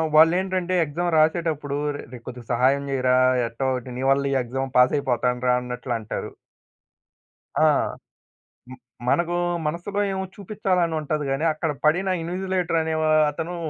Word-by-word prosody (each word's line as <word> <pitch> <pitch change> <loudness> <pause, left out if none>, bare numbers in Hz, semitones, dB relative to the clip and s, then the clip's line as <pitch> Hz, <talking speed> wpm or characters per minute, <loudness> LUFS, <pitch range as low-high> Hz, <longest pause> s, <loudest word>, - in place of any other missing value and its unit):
వాళ్లేంటంటే, 185 +3 +3
exam 165 +4 -2
రాసేటప్పుడు 155 -3 +1 0.2
"రే, - - -6
రే 125 - -7
కొద్దిగా 125 -2 -9
సహాయం 130 +4 +2
చెయ్యిరా, 130 -2 +2 0.3
ఎట్టో 115 +3 -3
ఒటి 125 0 -8
నీ 130 - -3
వల్ల 140 0 +2
ఈ - - +1
ఎక్సామ్ 135 +2 -4
పాస్ 125 +2 +5
అయిపోతానురా" 125 -1 +1
అన్నట్లు 125 0 -4
అంటారు. 110 - -5 1.3
ఆ! - - +4 1.0
హ్మ్. 130 0 -10 0.3
మనకు 175 +3 +1 0.3
మనసులో 175 +6 -2
ఏమో 190 0 -2
చూపిచ్చాలనుంటది 170 -7 -1
గాని, 135 +4 0
అక్కడ 160 0 -2
పడిన 180 +5 +3
ఇన్విజిలేటర్ 180 0 -1
అనే 160 0 -2
వ - - +1 0.3
అతను 165 +4 -5
155 Hz, 135 wpm, -24 LUFS, 130-175 Hz, 1.3 s, పాస్